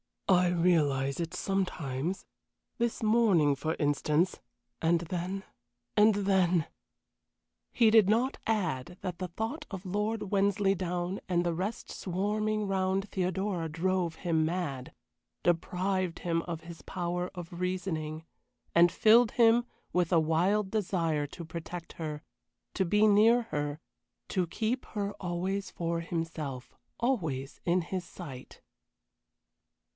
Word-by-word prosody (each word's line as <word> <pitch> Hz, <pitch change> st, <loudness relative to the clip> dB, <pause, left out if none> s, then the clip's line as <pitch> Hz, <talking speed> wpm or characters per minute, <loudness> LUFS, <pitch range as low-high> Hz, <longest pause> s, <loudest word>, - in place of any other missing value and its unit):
"I 180 Hz, -2 st, +5 dB
realize 155 Hz, -6 st, +2 dB
it 165 Hz, 0 st, -3 dB
sometimes 180 Hz, -4 st, -2 dB, 0.5 s
this 235 Hz, -1 st, -1 dB
morning, 215 Hz, -10 st, +4 dB
for 155 Hz, +4 st, -2 dB
instance 150 Hz, +4 st, +1 dB, 0.4 s
and 165 Hz, +1 st, +3 dB
then 180 Hz, +3 st, -3 dB, 0.5 s
and 210 Hz, 0 st, +6 dB
then 185 Hz, -4 st, +2 dB, 0.5 s
" -, -, -56 dB, 0.3 s
He 230 Hz, -3 st, +4 dB
did 215 Hz, -3 st, +6 dB
not 240 Hz, +5 st, +2 dB
add 180 Hz, -7 st, -1 dB
that 180 Hz, -3 st, -4 dB
the 185 Hz, -, -2 dB
thought 220 Hz, -, -4 dB
of 190 Hz, -2 st, -7 dB
Lord 210 Hz, +2 st, -2 dB
Wensleydown 195 Hz, -2 st, +1 dB
and 175 Hz, -1 st, +1 dB
the 170 Hz, -, +1 dB
rest 190 Hz, +7 st, -4 dB
swarming 210 Hz, +3 st, -1 dB
round 195 Hz, 0 st, 0 dB
Theodora 185 Hz, -2 st, -1 dB
drove 175 Hz, +1 st, 0 dB
him 165 Hz, -3 st, +1 dB
mad, 155 Hz, -6 st, -3 dB, 0.5 s
deprived 180 Hz, +1 st, 0 dB
him 165 Hz, -1 st, 0 dB
of 170 Hz, -2 st, -5 dB
his 170 Hz, 0 st, -10 dB
power 175 Hz, +1 st, -3 dB
of 175 Hz, -1 st, -7 dB
reasoning, 170 Hz, -4 st, -2 dB, 0.5 s
and 170 Hz, 0 st, +6 dB
filled 225 Hz, +3 st, +5 dB
him 235 Hz, 0 st, +5 dB, 0.3 s
with 180 Hz, -1 st, +1 dB
a 165 Hz, -, +6 dB
wild 185 Hz, +6 st, +2 dB
desire 170 Hz, -8 st, 0 dB
to 170 Hz, +4 st, -9 dB
protect 165 Hz, +1 st, -7 dB
her, 155 Hz, -2 st, -5 dB, 0.5 s
to 190 Hz, -, +1 dB
be 210 Hz, +5 st, +4 dB
near 220 Hz, +3 st, +5 dB
her, 145 Hz, 0 st, -2 dB, 0.5 s
to 180 Hz, -2 st, 0 dB
keep 225 Hz, +8 st, -2 dB
her 205 Hz, -1 st, -3 dB
always 185 Hz, +2 st, -2 dB
for 170 Hz, 0 st, -2 dB
himself, 165 Hz, -6 st, -4 dB, 0.3 s
always 160 Hz, -, -1 dB
in 180 Hz, +1 st, +3 dB
his 180 Hz, +1 st, -4 dB
sight. 135 Hz, -10 st, -10 dB
180 Hz, 125 wpm, -30 LUFS, 165-200 Hz, 0.5 s, and